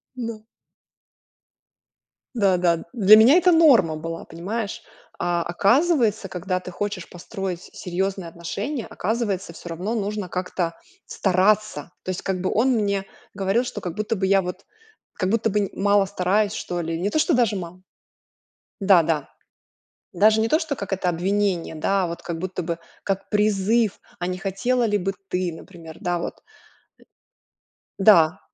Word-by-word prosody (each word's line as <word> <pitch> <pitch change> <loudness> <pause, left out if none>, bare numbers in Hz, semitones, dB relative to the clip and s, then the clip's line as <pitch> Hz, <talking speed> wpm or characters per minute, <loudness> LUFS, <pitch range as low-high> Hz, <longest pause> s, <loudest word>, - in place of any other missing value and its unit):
Да. 230 -3 -5 1.9
Да 195 -5 +3
да. 170 -2 +1
Для 210 -2 +7
меня 230 +8 +7
это 360 0 +5
норма 265 - +5
была, 165 +2 -6
понимаешь. 200 +6 -4 0.4
А, 175 -1 0
оказывается, 220 - +2
когда 185 0 -2
ты 185 0 -9
хочешь 205 -1 -4
построить 185 0 -5
с - - -15
серьёзные 190 0 -2
отношения, 200 - -5
оказывается, 205 -5 -2
всё 175 - -10
равно 180 +7 -3
нужно 205 -2 -2
как-то 180 -1 -2 0.3
стараться. 190 -3 +1
То - - -6
есть 185 - -3
как 185 -2 -2
бы 185 - 0
он 240 +5 +2
мне 200 -4 0 0.3
говорил, 195 +4 +1
что 215 -5 -6
как 175 - -4
будто 215 +1 -1
бы 190 -2 -1
я, 195 0 +4
вот, 180 +1 -6 0.5
как 185 -2 -1
будто 225 +1 +1
бы 210 - +1
н 200 - -1
мало 200 0 +3
стараюсь, 200 +2 +1
что 175 -4 -3
ли. 165 0 -3
Не 190 +4 0
то, 310 - 0
что 320 - +2
даже 235 -4 +2
мало. 180 -1 -7 1.0
Да 195 -3 +6
да. 155 -3 -1 0.9
Даже 215 +4 +4
не 225 - +2
то 310 +7 +3
что 315 -4 -3
как 200 -4 -5
это 185 -1 0
обвинение, 185 -1 0
да, 195 +5 +1
а - - 0
вот 170 0 -6
как 170 -2 -5
будто 180 0 -4
бы 170 0 -3 0.2
как 195 -1 -2
призыв: 210 +1 +2 0.2
"А 175 - -2
не 185 0 -3
хотела 210 +6 0
ли 210 -2 +2
бы 195 0 -1 0.2
ты, 180 -2 -1
например, 165 -1 -12
да, 175 -1 -1
вот?" - - -5 1.6
Э, - - 0
да. 175 -4 +6
195 Hz, 165 wpm, -23 LUFS, 175-215 Hz, 1.9 s, Для